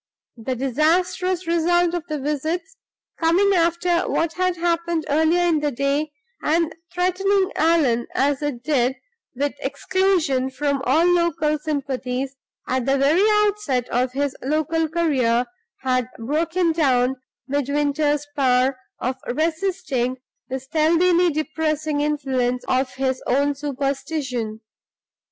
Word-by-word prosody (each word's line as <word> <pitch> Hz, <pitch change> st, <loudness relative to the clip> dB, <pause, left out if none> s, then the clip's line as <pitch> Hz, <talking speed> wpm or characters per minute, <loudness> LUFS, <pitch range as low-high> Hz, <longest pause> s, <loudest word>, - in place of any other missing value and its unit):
The 255 Hz, +3 st, -3 dB
disastrous 340 Hz, +8 st, +1 dB
result 340 Hz, +1 st, +2 dB
of 350 Hz, -2 st, -2 dB
the 305 Hz, -, -3 dB
visits 315 Hz, -, -3 dB, 0.4 s
coming 360 Hz, +5 st, +3 dB
after 345 Hz, 0 st, +1 dB
what 330 Hz, -1 st, 0 dB
had 365 Hz, 0 st, 0 dB
happened 335 Hz, -1 st, 0 dB
earlier 320 Hz, +4 st, +3 dB
in 330 Hz, -3 st, +2 dB
the 295 Hz, 0 st, 0 dB
day; 280 Hz, +3 st, -1 dB, 0.3 s
and 325 Hz, +1 st, +1 dB, 0.2 s
threatening 375 Hz, +2 st, +1 dB
Allan, 300 Hz, -8 st, +2 dB
as 280 Hz, +1 st, +1 dB
it 280 Hz, -5 st, -3 dB
did, 260 Hz, -3 st, +1 dB, 0.4 s
with 285 Hz, +3 st, -1 dB
exclusion 340 Hz, -9 st, 0 dB
from 280 Hz, +1 st, -1 dB
all 310 Hz, +7 st, +4 dB
local 340 Hz, -3 st, +2 dB
sympathies 270 Hz, -3 st, -3 dB, 0.3 s
at 260 Hz, 0 st, -1 dB
the 275 Hz, +1 st, +3 dB
very 285 Hz, +7 st, +3 dB, 0.2 s
outset 320 Hz, -, -1 dB
of 250 Hz, +1 st, 0 dB
his 280 Hz, 0 st, -1 dB
local 315 Hz, +3 st, 0 dB
career 260 Hz, -8 st, +1 dB, 0.4 s
had 255 Hz, -2 st, 0 dB
broken 330 Hz, +8 st, 0 dB
down 265 Hz, -5 st, +2 dB, 0.3 s
Midwinter's 290 Hz, +1 st, 0 dB
power 260 Hz, -1 st, +2 dB, 0.2 s
of 255 Hz, +2 st, -2 dB
resisting 310 Hz, -4 st, -1 dB, 0.3 s
the 265 Hz, +1 st, -2 dB
stealthily 335 Hz, +5 st, +3 dB
depressing 310 Hz, -1 st, -1 dB
influence 260 Hz, -4 st, 0 dB
of 255 Hz, 0 st, +1 dB
his 260 Hz, -1 st, -1 dB
own 285 Hz, +3 st, +2 dB
superstition. 275 Hz, -5 st, -3 dB
295 Hz, 120 wpm, -22 LUFS, 265-335 Hz, 0.4 s, all